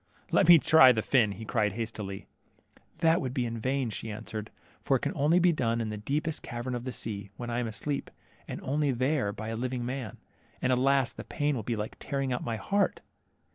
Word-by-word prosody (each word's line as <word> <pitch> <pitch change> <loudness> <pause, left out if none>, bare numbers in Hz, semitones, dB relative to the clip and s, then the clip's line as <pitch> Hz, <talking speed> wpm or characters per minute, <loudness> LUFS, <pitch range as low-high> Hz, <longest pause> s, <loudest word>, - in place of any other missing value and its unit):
Let - - +4
me 175 -1 +10
try 155 -4 +7
the 110 -3 0
fin," 110 -5 +2
cried 105 -3 +1
he - - -9
hastily. 105 -4 -5 0.8
That 165 0 +4
would 130 -1 -4
be 125 -3 +1
in 115 -1 -4
vain," 130 0 -1
she 110 - -5
answered, 110 0 -6 0.3
for - - +2
it - - -13
can - - -1
only 150 +5 +3
be 180 0 +5
done 115 -5 0
in 110 -2 -2
the 105 - -4
deepest 150 +8 -2
cavern 120 +1 -5
of 120 0 -4
the 130 - -3
sea, 100 -5 -4
when 120 -1 -5
I 120 - 0
am 120 - -1
asleep, 140 +6 -3 0.4
and - - -5
only 145 +2 0
there 130 -2 +1
by 110 +2 -6
a 115 - -3
living 125 +1 -2
man; 125 -4 -4 0.4
and, 130 - +2
alas, 130 -1 +2
the - - -8
pain 145 -2 -1
will 120 - -2
be 115 +3 -2
like 105 0 -5
tearing 135 -2 -2
out 125 - -3
my 115 - -2
heart." 200 - 0
125 Hz, 220 wpm, -29 LUFS, 110-140 Hz, 0.8 s, me